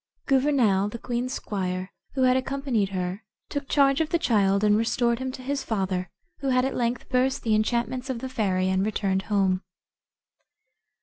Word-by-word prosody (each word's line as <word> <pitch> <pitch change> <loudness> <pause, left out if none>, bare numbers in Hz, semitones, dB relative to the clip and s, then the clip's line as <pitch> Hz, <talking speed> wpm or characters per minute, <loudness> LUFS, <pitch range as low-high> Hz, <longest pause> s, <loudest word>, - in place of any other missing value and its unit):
Gouvernail, 255 -8 +3
the 235 - -6
queen's 245 +1 -3
squire, 185 -5 -3 0.2
who 265 - +2
had 255 0 +5
accompanied 260 -6 0
her, 185 +1 -3 0.3
took 285 -1 -4
charge 275 0 +4
of 315 - 0
the 340 - +2
child, 200 -8 +2
and 210 -1 +5
restored 235 +2 +1
him 260 0 -3
to 255 - -8
his 280 +1 -2
father, 190 -4 -2 0.3
who 275 - -3
had 255 0 +3
at 265 - -1
length 240 0 -1
burst 260 +1 +1
the 220 - +1
enchantments 240 +4 0
of 260 - -1
the 260 +3 -5
fairy, 195 -7 0
and 190 0 +1
returned 195 -2 0
home. 190 -3 +2
235 Hz, 175 wpm, -26 LUFS, 195-260 Hz, 0.3 s, had